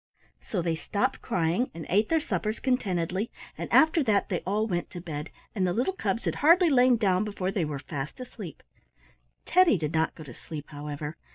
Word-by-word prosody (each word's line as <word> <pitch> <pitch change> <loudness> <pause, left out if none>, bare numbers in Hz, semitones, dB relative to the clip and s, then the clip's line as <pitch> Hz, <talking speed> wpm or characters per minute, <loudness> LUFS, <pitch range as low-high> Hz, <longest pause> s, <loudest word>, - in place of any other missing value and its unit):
So 185 -5 -3
they 165 -1 +1
stopped 230 +10 -1
crying 180 +3 0
and 165 - -6
ate 210 +5 +2
their 325 - +3
suppers 215 - -2
contentedly, 195 -5 0 0.3
and - - -6
after 315 +1 +5
that 205 -3 +2
they 180 - 0
all 210 +3 +1
went 175 -5 -2
to 175 - -7
bed, 155 -4 -5 0.2
and 190 -4 +1
the 175 - +1
little 250 - 0
cubs 220 - -2
had - - -1
hardly 335 +2 +6
lain 250 -2 +5
down 190 -3 +2
before 200 -3 -2
they 190 -5 0
were 150 -2 -3
fast 140 - -6
asleep. 220 -9 -9 0.8
Teddy 360 - +5
did 155 -2 -3
not 160 0 +1
go 155 - -9
to 135 -5 -10
sleep, 150 +4 -8
however. 145 +1 -6
190 Hz, 195 wpm, -28 LUFS, 165-240 Hz, 0.8 s, hardly